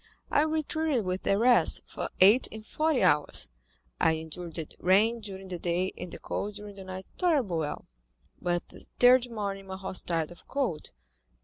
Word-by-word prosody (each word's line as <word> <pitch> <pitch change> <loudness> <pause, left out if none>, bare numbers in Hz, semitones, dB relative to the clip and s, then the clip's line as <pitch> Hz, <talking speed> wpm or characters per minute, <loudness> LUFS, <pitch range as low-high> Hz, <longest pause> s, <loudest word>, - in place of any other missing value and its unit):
I - - +4
retreated 310 -5 0
with 185 +1 -2
the 195 - +2
rest, 245 +3 +4
for - - -5
eight 205 +7 +7
and 220 0 -9
forty 305 -2 +1
hours. 150 - +2 0.5
I 160 - +4
endured 160 +1 -6
the 160 -3 -4
rain 215 +6 +3
during 195 -2 -8
the 180 -2 -4
day, 175 +2 -1
and 180 0 -7
the - - -7
cold 205 0 -4
during 205 -1 -9
the 195 - -8
night 185 0 -7
tolerably 275 - +2
well, 150 -2 -4 0.5
but 175 0 -1
the - - -15
third 250 0 +6
morning 200 -3 -4
my 190 0 -6
horse 190 -1 -3
died 165 -2 -1
of 175 - -15
cold. 260 - -2
195 Hz, 180 wpm, -29 LUFS, 175-240 Hz, 0.5 s, eight